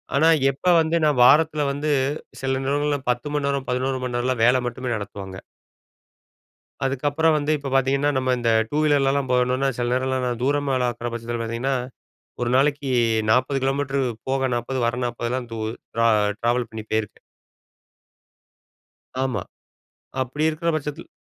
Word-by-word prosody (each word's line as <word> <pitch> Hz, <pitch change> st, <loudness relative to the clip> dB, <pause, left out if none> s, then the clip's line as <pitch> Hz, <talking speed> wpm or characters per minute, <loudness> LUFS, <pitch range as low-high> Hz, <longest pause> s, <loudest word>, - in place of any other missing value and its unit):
ஆனா, 155 Hz, +3 st, +4 dB, 0.2 s
எப்ப 140 Hz, +7 st, -16 dB, 0.2 s
வந்து 160 Hz, +1 st, 0 dB
நான் 145 Hz, -5 st, +3 dB
வாரத்தில 155 Hz, +2 st, +4 dB
வந்து 145 Hz, +2 st, -2 dB, 0.5 s
சில 135 Hz, 0 st, 0 dB
நேரங்கள்ல 145 Hz, +1 st, +1 dB
10 125 Hz, +4 st, -4 dB
மணி 145 Hz, -1 st, 0 dB
நேரம் 140 Hz, -1 st, -2 dB
11 130 Hz, +1 st, -1 dB
மணி 125 Hz, -1 st, -3 dB
நேரம் 125 Hz, -1 st, -1 dB
வேல 125 Hz, +1 st, +5 dB
மட்டுமே 125 Hz, +1 st, -4 dB
நடத்துவாங்க. 95 Hz, -2 st, -7 dB, 1.5 s
அதுக்கப்புறம் 145 Hz, +4 st, +1 dB
வந்து 150 Hz, 0 st, -1 dB
இப்ப 140 Hz, -1 st, -6 dB
பார்த்தீங்கன்னா, 135 Hz, +2 st, +2 dB
நம்ம 130 Hz, -1 st, +1 dB
இந்த 120 Hz, -1 st, +1 dB, 0.2 s
டூ 150 Hz, -, -1 dB
வீலர்லலாம் 140 Hz, -2 st, +2 dB
போணுனா, 125 Hz, +2 st, +2 dB
சில 120 Hz, -, 0 dB
நேரம்லாம் 130 Hz, 0 st, 0 dB
நான் 120 Hz, 0 st, -3 dB
தூரமாலாம் 135 Hz, -3 st, +1 dB
இருக்கிற 120 Hz, 0 st, -5 dB
பட்சத்தில, 120 Hz, 0 st, -4 dB
பார்த்தீங்கன்னா 120 Hz, +4 st, -1 dB, 0.7 s
ஒரு 120 Hz, -, 0 dB
நாளைக்கு 140 Hz, +1 st, +1 dB, 0.4 s
40 130 Hz, +4 st, +2 dB
கிலோமீட்டர் 135 Hz, 0 st, 0 dB, 0.3 s
போக 135 Hz, 0 st, +1 dB
40 125 Hz, +2 st, -2 dB
வர 120 Hz, +1 st, 0 dB
40லாம் 120 Hz, +1 st, -3 dB
து 115 Hz, -, -5 dB, 0.4 s
டிரா 115 Hz, 0 st, +1 dB, 0.3 s
டிராவல் 120 Hz, +1 st, 0 dB
பண்ணி 110 Hz, -1 st, -7 dB
போயிருக்கேன். 110 Hz, -2 st, -2 dB, 2.0 s
ஆமா. 130 Hz, -2 st, -2 dB, 0.8 s
அப்டி 130 Hz, +4 st, -3 dB
இருக்கற 165 Hz, +2 st, -3 dB
பட்சத்தில் 150 Hz, +2 st, -6 dB
130 Hz, 140 wpm, -23 LUFS, 120-145 Hz, 2.0 s, வேல